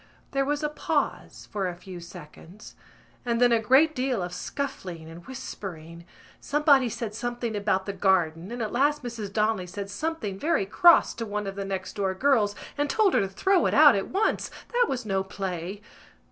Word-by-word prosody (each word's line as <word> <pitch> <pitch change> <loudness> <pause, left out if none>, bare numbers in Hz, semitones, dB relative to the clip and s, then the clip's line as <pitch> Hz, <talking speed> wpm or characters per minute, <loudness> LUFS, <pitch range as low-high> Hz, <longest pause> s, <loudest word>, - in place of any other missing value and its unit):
There 275 -1 +1
was 290 +1 -1
a 300 - +1
pause 300 - -2
for 200 -3 -1
a 180 - -4
few 180 0 -10
seconds; 170 +4 -12 0.5
and 235 -1 0
then 245 -1 +5
a 230 - +4
great 265 +8 +4
deal 255 -7 -1
of 175 0 -5
scuffling 180 - -5
and 165 +2 -11
whispering. 170 -9 -8 0.3
Somebody 285 -4 +3
said 230 -2 -5
something 240 0 -3
about 200 -2 0
the 200 - -3
garden, 180 -3 +1
and 240 -1 -3
at 215 - -3
last 285 +3 +1
Mrs 225 -5 -5
Donnelly 210 -3 0
said 200 +2 -6
something 225 -7 -3
very 310 -8 +1
cross 340 - +5
to 230 - -5
one 210 0 -3
of 195 - -4
the 200 0 -5
next 195 -1 -4
door 190 -2 0
girls 220 -4 +2 0.2
and 290 0 +1
told 425 0 +3
her - - +4
to 195 - 0
throw 360 - +2
it - - 0
out 295 -1 +8
at 195 - -1
once: 395 +4 0 0.2
that 485 -1 +3
was 250 -3 -3
no 195 -2 0
play. 190 0 -5
210 Hz, 190 wpm, -26 LUFS, 190-270 Hz, 0.5 s, out